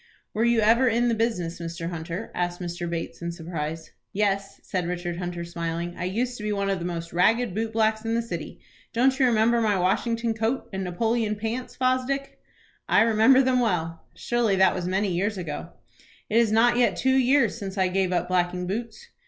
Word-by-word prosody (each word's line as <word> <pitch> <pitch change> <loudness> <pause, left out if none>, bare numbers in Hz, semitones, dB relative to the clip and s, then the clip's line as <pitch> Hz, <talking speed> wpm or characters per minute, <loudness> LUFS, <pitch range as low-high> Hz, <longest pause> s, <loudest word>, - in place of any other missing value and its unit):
"Were 220 - 0
you 235 -1 +3
ever 230 +4 +4
in 240 +1 +2
the - - +2
business, 215 -8 -1
Mr. 170 0 -5
Hunter?" 170 +5 -5
asked 175 0 -2
Mr. 175 -1 -4
Bates, 170 0 -5
in 170 0 -3
surprise. 160 -2 -5 0.2
"Yes," 195 -1 -1
said 180 -2 -2
Richard 175 -1 -3
Hunter, 175 -1 -4
smiling; 170 0 -4
"I - - -4
used 245 +7 -2
to 210 - -8
be 210 - -1
one 200 -1 0
of 195 - -1
the 170 - -5
most 170 -1 -5
ragged 220 +5 +2
boot 220 +2 -2
blacks 220 0 +1
in 225 0 -1
the 235 - 0
city. 230 - -6 0.3
Don't 260 +3 +2
you 260 - +5
remember 230 0 +3
my 210 -3 +2
Washington 230 +5 0
coat, 225 +4 -1
and 190 0 -2
Napoleon 215 +4 0
pants, 225 +4 -4
Fosdick?" 255 +2 -1 0.5
"I - - +5
remember 230 +4 +5
them 255 -1 +2
well." 165 -8 -1
"Surely 235 -4 +1
that 190 -1 +4
was 180 -1 -3
many 190 +1 0
years 200 +4 -1
ago?" 160 -5 -5 0.6
"It 220 - +3
is 230 -2 +4
not 235 +2 +4
yet 245 - +3
two 260 0 +2
years 260 -3 +3
since 195 -3 -6
I 190 -1 +3
gave 185 0 0
up 175 -1 0
blacking 180 0 0
boots." 230 - -5
205 Hz, 200 wpm, -25 LUFS, 175-230 Hz, 0.6 s, you